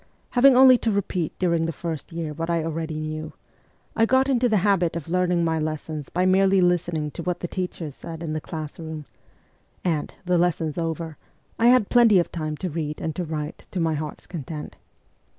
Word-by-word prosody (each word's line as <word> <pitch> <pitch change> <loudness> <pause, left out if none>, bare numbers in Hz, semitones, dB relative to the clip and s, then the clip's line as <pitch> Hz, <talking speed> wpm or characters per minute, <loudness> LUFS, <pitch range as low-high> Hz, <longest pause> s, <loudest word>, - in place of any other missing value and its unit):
Having 255 +1 +6
only 255 -1 +8
to 230 - 0
repeat 190 -5 -2
during 170 -3 +1
the - - -1
first 165 0 -5
year 165 -2 -4
what 165 +2 -4
I 170 -1 +1
already 160 -1 -3
knew, 155 0 -5 0.6
I 225 - +3
got 260 +2 +3
into 245 -2 +3
the 215 - +3
habit 180 -5 +2
of 170 -1 -5
learning 180 -1 +2
my 160 -1 +1
lessons 155 -1 -4
by 180 +1 0
merely 190 +1 +4
listening 175 -4 +1
to 170 - -6
what 180 +1 -2
the 175 - -2
teachers 175 -5 -4
said 165 +3 -8
in 155 -2 -3
the 155 - -2
class 155 -1 -7
room; 160 -2 -6 0.8
and, 160 -5 -1
the 180 -1 +2
lessons 165 -3 0
over, 165 -2 -3 0.4
I 230 - +5
had 245 -4 +5
plenty 235 -5 +6
of 175 - +1
time 155 -2 -3
to 185 - -3
read 150 -1 -3
and 160 - -3
to 180 - -2
write 155 -2 -5
to 185 - -4
my 165 -1 +1
heart's 150 0 -5
content. 150 -2 -7
170 Hz, 200 wpm, -24 LUFS, 155-185 Hz, 0.8 s, only